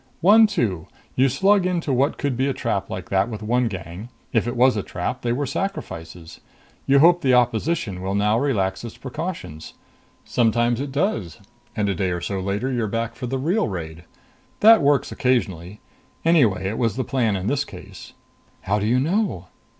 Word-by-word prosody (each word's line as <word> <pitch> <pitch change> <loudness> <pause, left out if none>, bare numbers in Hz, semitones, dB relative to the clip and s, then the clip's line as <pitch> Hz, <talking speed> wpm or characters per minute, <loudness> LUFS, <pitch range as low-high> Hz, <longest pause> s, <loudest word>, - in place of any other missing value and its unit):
"One 215 +5 +7
two. 110 - -2 0.3
You 135 +1 +3
slug 195 - +3
into 170 -6 -1
what 135 +4 +1
could 140 -3 -1
be 130 +3 0
a 135 - 0
trap 100 -5 -2
like 90 -1 -6
that 95 +3 +2
with 110 -2 -6
one 120 +3 +1
gang. 95 +1 -7 0.2
If 115 0 +1
it 120 - -3
was 125 +1 +4
a 105 - -1
trap, 95 +7 -4
they 120 - -1
were 140 +4 -1
sacrifices. 85 - -6 0.5
You 140 0 +5
hope 170 +4 +5
the 130 -2 +3
opposition 120 - 0
will 95 +1 -2
now 105 +2 +2
relax 100 -9 -1
its 115 - -8
precautions. 130 - -6 0.5
Sometimes 120 +1 +1
it 140 -1 -4
does 140 - -1 0.4
and 105 -1 0
a 100 - +1
day 95 +1 -1
or 90 -1 -2
so 95 +2 -3
later 100 +7 -2
you're 120 -3 -1
back 115 +2 -3
for 125 - -6
the 135 +2 -2
real 165 - 0
raid. 85 -4 -6 0.6
That 225 -2 +8
works 140 -1 +2
occasionally. 105 - -1 0.4
Anyway 115 - +3
it 105 - -3
was 115 -3 0
the 130 - -1
plan 120 -7 0
in 95 -1 -4
this 140 +5 0
case." - - -12 0.5
"How 105 +2 0
do 105 - -1
you 125 +3 +3
know?" 160 - -1
120 Hz, 190 wpm, -22 LUFS, 95-140 Hz, 0.6 s, That